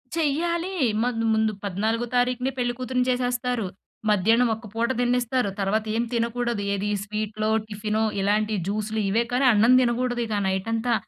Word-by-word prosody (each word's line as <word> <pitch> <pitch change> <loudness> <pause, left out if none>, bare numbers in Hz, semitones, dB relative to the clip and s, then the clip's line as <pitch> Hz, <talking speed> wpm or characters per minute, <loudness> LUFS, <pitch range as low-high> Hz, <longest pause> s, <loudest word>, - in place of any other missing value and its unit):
చెయ్యాలి. 340 +4 0 0.3
మాకు 230 -2 -1
ముందు 220 0 +2
పద్నాలుగో 220 +5 -1
తారీఖునే 250 +1 +1
పెళ్ళికూతురుని 250 +1 -1
చేసేస్తారు, 245 -2 0 0.4
మధ్యాహ్నం 225 +4 +3
ఒక 225 0 -11
పూట 235 +2 0
తిన్నిస్తారు, 245 -2 +1
తర్వాత 210 +3 0
ఏం 235 - +1
తినకూడదు. 235 -1 -1
ఏది 200 +1 -2
స్వీట్లో, 215 +1 -3 0.2
టిఫినో 215 +1 -2 0.2
ఇలాంటి 210 +2 +1
జ్యూసులు 215 +1 -2
ఇవే 230 +4 +2
కానీ 260 +2 +2
అన్నం 225 +4 +5
తినకూడదు. 245 0 0
ఇక 210 -1 -1
నైట్ 190 +3 -1
అంతా, 235 +1 0
230 Hz, 140 wpm, -25 LUFS, 215-250 Hz, 0.4 s, అన్నం